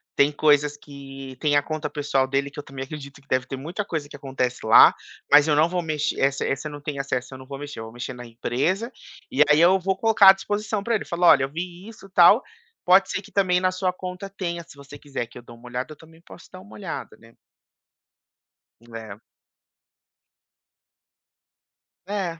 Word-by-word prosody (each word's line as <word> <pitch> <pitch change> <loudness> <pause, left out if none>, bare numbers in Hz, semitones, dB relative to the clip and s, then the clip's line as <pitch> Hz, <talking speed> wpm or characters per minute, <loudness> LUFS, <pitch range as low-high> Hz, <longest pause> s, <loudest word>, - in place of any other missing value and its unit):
tem 140 - +4
coisas 150 -1 +2
que 135 -2 -11
tem 145 -1 +1
a 145 - +3
conta 155 0 -4
pessoal 140 -3 0
dele, 140 +1 -1
que 145 - -9
eu - - -6
também 135 -1 -7
acredito 140 0 -10
que 140 - -30
deve 130 0 +1
ter - - -5
muita 175 +9 -5
coisa 155 -5 -4
que - - -10
acontece 130 -3 -3
lá, 110 - +8 0.4
mas 145 +1 +7
eu 150 - +3
não 155 +3 +3
vou 180 0 -1
mex 155 -3 -1
essa 135 0 +1
essa 135 +3 -2
não 145 0 -9
tem 145 -1 -5
acesso, 130 -1 -3
eu - - -8
não 130 - -12
vou 140 0 -8
mexer, 145 -3 -8
eu 110 - -6
vou 110 - -11
mexer 120 +2 -6
na 125 0 -10
empresa, 135 - -2 0.4
e 135 - +1
aí 150 +2 +5
eu 185 +3 +5
vou 190 +1 -1
colocar 220 -3 +6
à 190 - +10
disposição 205 +1 -3
para 235 0 0
ele - - -3
falar: 175 +1 +1
"Olha, 135 - +6
eu - - -8
vi 175 +5 -7
isso, 215 -3 -13
tal. 190 +7 +6 0.4
Pode 190 +2 +5
ser 200 - -2
que - - -16
também 185 -2 +2
na 185 0 +2
sua 185 0 -1
conta 185 +1 -7
tenha, 175 -4 -5
se - - -15
você 140 +1 -12
quiser 135 -5 -5
que 120 - -14
eu - - -10
dou 120 0 -13
uma 120 +1 -15
olhada, 125 +5 -4
eu 150 - -19
também 160 0 -18
posso 170 - -15
dar 185 - -11
uma 205 - -16
olhada," 190 -5 -7
né. 115 0 -19 1.6
É. 110 -2 -9 2.9
É. 190 -5 -3
150 Hz, 210 wpm, -24 LUFS, 135-180 Hz, 2.9 s, à